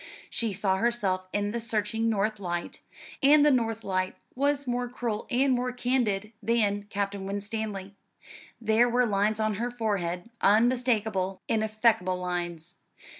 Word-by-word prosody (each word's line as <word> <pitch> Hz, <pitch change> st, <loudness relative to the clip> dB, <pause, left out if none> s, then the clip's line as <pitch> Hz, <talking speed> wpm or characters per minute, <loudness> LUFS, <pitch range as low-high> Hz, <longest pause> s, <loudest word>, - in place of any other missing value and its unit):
She 230 Hz, -2 st, 0 dB
saw 190 Hz, -1 st, +1 dB
herself 195 Hz, -5 st, 0 dB
in 205 Hz, 0 st, -1 dB
the 235 Hz, -, -2 dB
searching 225 Hz, 0 st, -1 dB
north 215 Hz, 0 st, 0 dB
light; 175 Hz, -2 st, -4 dB, 0.4 s
and 290 Hz, +1 st, +6 dB
the 300 Hz, -, +6 dB
north 225 Hz, -3 st, 0 dB
light 185 Hz, -1 st, -1 dB, 0.2 s
was 285 Hz, +1 st, +1 dB
more 245 Hz, 0 st, -1 dB
cruel 235 Hz, -3 st, -3 dB
and 260 Hz, +1 st, +3 dB
more 250 Hz, 0 st, 0 dB
candid 240 Hz, -4 st, 0 dB
than 205 Hz, -2 st, +1 dB
Captain 200 Hz, -1 st, -3 dB
Winstanley. 205 Hz, -1 st, -4 dB, 0.7 s
There 225 Hz, +2 st, +3 dB
were 245 Hz, +1 st, +3 dB
lines 210 Hz, 0 st, +1 dB
on 215 Hz, -2 st, 0 dB
her 240 Hz, -, 0 dB
forehead 205 Hz, -4 st, -2 dB
unmistakable, 220 Hz, -4 st, +2 dB
ineffaceable 215 Hz, -4 st, +2 dB
lines. 175 Hz, -1 st, -4 dB
215 Hz, 135 wpm, -28 LUFS, 195-240 Hz, 0.7 s, and